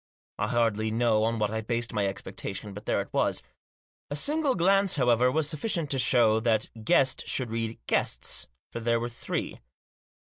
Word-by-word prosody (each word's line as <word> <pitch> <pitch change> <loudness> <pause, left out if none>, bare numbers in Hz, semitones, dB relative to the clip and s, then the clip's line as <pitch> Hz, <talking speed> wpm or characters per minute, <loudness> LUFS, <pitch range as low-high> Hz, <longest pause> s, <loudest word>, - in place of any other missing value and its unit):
I - - 0
hardly 115 -3 +1
know 110 -1 +2
on 115 0 0
what 105 -1 0
I 110 0 -2
based 120 +1 -2
my 105 -2 +1
expectation, 100 +1 -6
but 105 +2 -10
there - - +1
it - - -10
was. - - +1 0.7
A 145 - -3
single 290 - +1
glance, 195 +2 +3
however, 125 -2 +3
was 155 +1 +1
sufficient 155 0 -1
to 135 - +1
show 115 -4 +4
that 110 -1 0
"guest" 130 +4 +2
should 125 -4 0
read 115 0 -3
"guests," - - -1 0.2
for - - -5
they 115 0 +1
were 120 +1 -3
three. 120 - -4
115 Hz, 175 wpm, -28 LUFS, 110-135 Hz, 0.7 s, show